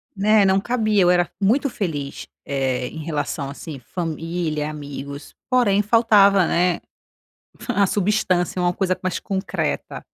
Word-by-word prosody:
Né, 205 +1 +4
não 190 0 +3
cabia 215 -2 +1
eu 175 - +4
era 175 -1 +2
muito 250 +8 +2
feliz, 160 - -4 0.2
eh, 130 -3 -1
em 160 - -8
relação 145 -2 -3
assim 140 0 -8
família, 165 +1 -3
amigos, 140 -1 -8
porém 230 -6 +3
faltava, 200 -4 +5
né, 175 0 +1 0.8
fa 235 -5 -1
a 200 - +5
substância, 185 -3 0
uma 175 0 +2
coisa 185 0 -1
mais 185 - -2
concreta. 195 0 -3
180 Hz, 135 wpm, -22 LUFS, 155-205 Hz, 0.8 s, faltava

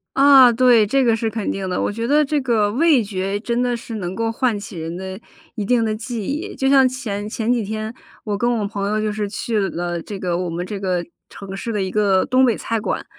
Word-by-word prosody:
啊， 270 -2 +7
对， 235 -2 +5
这 270 +4 +2
个 230 -2 +3
是 225 0 -1
肯 220 -2 -3
定 195 -1 -4
的。 180 - -1
我 - - 0
觉 230 +3 -3
得 295 +3 +4
这 290 +1 0
个 225 -5 +1
味 285 0 +3
觉 195 0 -3
真 235 +2 -1
的 245 -1 0
是 230 0 -8
能 185 -3 -4
够 225 +1 -1
唤 235 -1 0
起 200 -2 -9
人 165 +1 -5
的 190 +1 -6 0.4
一 210 - -3
定 230 +2 +2
的 215 - -1
记 225 -1 -5
忆。 295 - -4
就 270 - 0
像 270 -2 +6
前 215 -5 -5
前 225 +1 -1
几 235 -3 0
天， 215 +2 -4 0.3
我 205 -2 -2
跟 240 +3 +1
我 205 - -1
朋 200 -1 -3
友 215 +1 0
就 215 -1 -1
是 210 -1 -3
去 220 +2 -2
了 175 0 -3
这 200 +4 -7
个 175 -2 -1
我 180 -1 -2
们 170 +2 -4
这 200 +1 -5
个 180 -3 -1 0.2
城 195 -1 -9
市 230 +4 -4
的 210 -3 -1
一 190 - -2
个 200 -2 +2
东 255 +1 +3
北 235 -4 +3
菜 230 -1 -2
馆， - - -3
215 Hz, 270 characters per minute, -20 LUFS, 195-240 Hz, 0.4 s, 啊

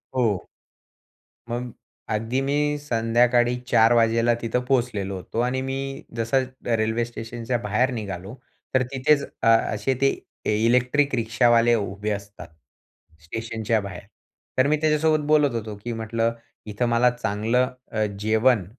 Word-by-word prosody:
हो. 110 -8 +1 1.0
मग 120 +1 -3 0.4
अगदी 115 +4 -1
मी 145 +2 0
संध्याकाळी 120 -2 +2 0.2
04:00 115 +1 +5
वाजेला 115 0 +3
तिथं 115 +2 0
पोहोचलेलो 115 -7 0
होतो 95 +5 -5
आणि 125 +2 0
मी 135 +1 -4 0.2
जसं 115 +4 +1 0.2
रेल्वे 115 0 +1
स्टेशनच्या 120 +1 -4
बाहेर 120 +4 0
निघालो, 100 -2 -6 0.4
तर 130 -1 +3
तिथेच 140 +2 +2 0.2
अ, - - +3
असे 115 +1 +3
ते 135 - +5 0.4
ए 105 - +2
इलेक्ट्रिक 125 +4 +2
रिक्षावाले 120 +1 +3
उभे 100 0 -3
असतात 100 0 -6 0.8
स्टेशनच्या 110 +4 -2
बाहेर. 95 -3 -7 0.6
तर 130 +1 +4
मी 155 +1 +2
त्याच्यासोबत 155 0 +2
बोलत 150 -3 +4
होतो, 110 -2 -4
की 120 - -3
म्हटलं 115 +1 -1 0.3
इथं 105 +3 -2
मला 120 +1 +4
चांगलं 115 +3 0 0.2
अ, 110 -1 0
जेवण 110 -1 +2
115 Hz, 130 wpm, -24 LUFS, 110-130 Hz, 1.0 s, 04:00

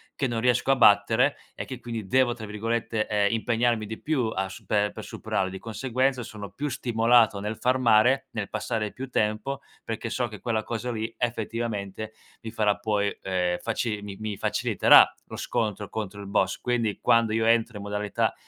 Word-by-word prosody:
che 140 - -1
non 120 -2 -2
riesco 125 +2 +2
a 135 - +3
battere 115 +4 +5 0.2
e - - -6
che 130 - -8
quindi 115 -4 -5
devo, 130 +3 +3
tra 115 -2 -8
virgolette, 110 +1 -2
ehm, 105 0 +1
"impegnarmi 115 0 +1
di 110 +1 -7
più" 145 -7 0
a 95 0 -1
supe 105 +2 -1
per - - -8
superarlo, 95 - -2
di 95 0 -7
conseguenza 130 +4 -1
sono 105 -3 -8
più 145 +1 -3
stimolato 115 -3 +3
nel 105 +2 -4
farmare, 125 0 +3
nel 105 -3 -3
passare 110 0 -2
più 130 +1 -7
tempo, 110 +4 -1 0.2
perché 115 0 -4
so 120 +1 -1
che 105 -2 -9
quella 110 -3 -1
cosa 120 +2 -3
lì 110 0 -4
effettivamente 110 -3 -3 0.3
mi 110 - -6
farà 105 -3 +1
poi, 100 -1 0
ehm, 90 -2 0
faci 115 -2 -2
mi 100 -1 -7
mi 105 -2 -4
faciliterà - - +5
lo - - -9
scontro 105 -2 -2
contro 105 -2 -5
il 100 - -8
boss. 95 -1 +1
Quindi 115 -4 -1
quando 115 -2 +3
io 110 0 +1
entro 115 0 +2
in 100 - -7
modalità 105 0 -1
110 Hz, 180 wpm, -26 LUFS, 105-120 Hz, 0.3 s, battere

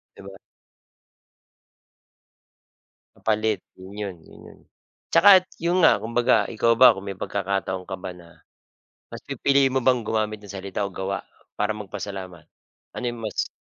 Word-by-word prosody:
'Di - - -13
ba. 100 0 -10 2.8
Papalit 110 -1 -1 0.2
'yun 95 +2 -11
'yon, 100 -3 -5
'yun - - -16
'yon. - - -15 0.5
Tsaka 205 - +6 0.3
'yon 175 +2 +2
nga 160 -9 +6
kumbaga 120 +2 +2
ikaw 115 +1 +2
ba 125 +2 +8
kung 95 +1 -7
may 100 - -4
pagkakataon 95 -1 -3
ka 95 - -4
ba 95 0 -7
na, 85 -1 -16 0.6
mas - - -10
pipiliin 140 -1 +2
mo 130 - +1
bang 125 -2 +4
gumamit 110 -1 -2
ng 100 - -11
salita 100 +1 -4
o 100 - -2
gawa 95 +1 -4 0.3
para 105 +1 -1
magpasalamat? 100 -4 -6 0.6
Ano - - -5
'yong 120 -1 -4
mas 110 - -2
105 Hz, 145 wpm, -24 LUFS, 95-115 Hz, 2.8 s, ba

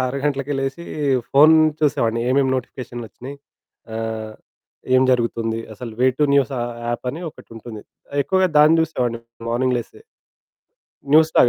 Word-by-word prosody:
6 135 +2 -3
గంటలకే 140 0 -1
లేసీ, 135 +5 -4 0.5
ఫోను 155 +3 +7 0.2
చూసేవాడిని 115 -5 +1
ఏమేం 135 0 +3
నోటిఫికేషన్లొచ్చినయి, 125 +1 -7 0.6
ఆహ్, 110 -1 -4 0.6
ఏం 130 - +6
జరుగుతుంది, 115 -2 0
అసలు 115 +1 -8
వే 130 - +5
టు 150 - +4
న్యూస్ 140 0 +2
ఆహ్, 120 0 -3 0.2
యాప్పని 125 +6 -3
ఒకటుంటుంది. 115 -4 -11 0.3
ఆహ్, 145 - -3
ఎక్కువగా 190 -1 +2
దాన్ని 155 +2 +6
జూసేవాడిని 125 -7 -1 0.3
మార్నింగ్ 125 +1 +1
లేసి. 120 - -9 1.1
న్యూస్‌లాగ. 155 -5 +5
130 Hz, 125 wpm, -21 LUFS, 115-145 Hz, 1.1 s, ఫోను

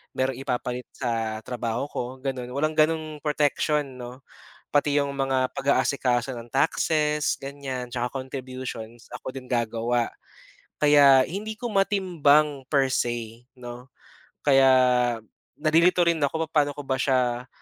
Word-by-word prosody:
merong 130 -1 -1
ipapalit 125 -1 -3
sa 115 -3 -2
trabaho 120 0 -3
ko - - -3 0.2
ganun, 130 -3 -4
walang 155 +2 0
ganung 155 -1 +1
protection 150 0 +1 0.2
'no. 125 +2 -9 0.5
Pati 145 0 +3
yung 140 -1 -1
mga 135 -1 +1
pag-aasikaso 135 -2 +1
ng 120 0 -9
taxes 150 +1 +1
ganyan, 135 -2 -5
tsaka 125 +2 -3
contributions 130 -3 -7
ako - - -6
din 130 -1 -8
gagawa. 120 0 0 0.7
Kaya 140 -3 +6
hindi 210 +5 -5
ko 240 - -3
matimbang 155 -8 +2
per 135 -2 +3
say 120 -1 -2
'no, 120 +1 -9 0.6
kaya 135 -2 +5 0.9
nalilito 170 +3 +4
rin 165 -2 +1
ako 160 +3 0
papaano 145 -2 +2
ko 145 - -7
ba 130 - +1
siya 125 -2 +1
135 Hz, 125 wpm, -25 LUFS, 125-150 Hz, 0.9 s, Kaya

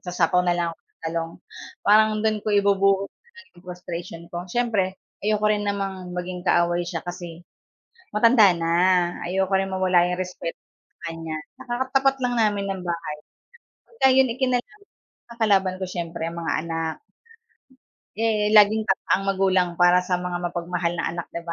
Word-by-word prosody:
magsasapaw 180 0 +1
na 175 - +2
lang 170 -1 0
ako - - -19
ng - - -48
talong." 165 0 -2 0.5
parang 215 +1 +6
do'n 215 -1 +1
ko - - -2
ibubuhos 195 -1 +3
muna 475 0 -20 0.2
yung 175 - -17
frustration 175 -1 -7
ko. 175 +1 -4
Siyempre, 205 -5 0 0.3
ayoko 215 0 +1
rin 210 -1 +1
namang 195 -3 -3
maging 180 0 -4
kaaway 175 0 +2
siya, 170 -1 -4
kasi 175 -1 -8 0.7
matanda 230 -2 +6
na, 165 0 -2 0.6
ayoko 190 +1 0
rin 195 0 +1
mawala 185 -2 +3
'yong 180 0 -2
respeto 180 -2 -6 0.5
sa 165 - -4
kanya. 165 -1 -6 0.2
Tsaka, 250 -2 -7 0.2
katapat 270 0 +3
lang 245 0 0
namin 205 -2 +1
ng 190 -1 -7
bahay. 170 -3 -3 0.8
Pagka 265 - +5
iyon, 265 -1 +4
eh, 245 - -13
kinalab 255 - -1 0.5
ang 235 0 -13
kalaban 195 -3 +3
ko - - -1
siyempre, 170 -2 -5
ang 170 - -9
mga 160 -3 -1
anak. 165 -1 -3 1.2
Eh, 215 -2 +1
laging 210 +1 +6
tama 195 - +1
ang 195 - +2
magulang 190 -2 +2
para 175 +1 +5
sa 180 0 -1
mga 180 0 -4
mapagmahal 175 0 -2
na - - -2
anak 175 -1 -5
di 170 - -4
ba? 170 - -4
185 Hz, 170 wpm, -24 LUFS, 175-210 Hz, 1.2 s, parang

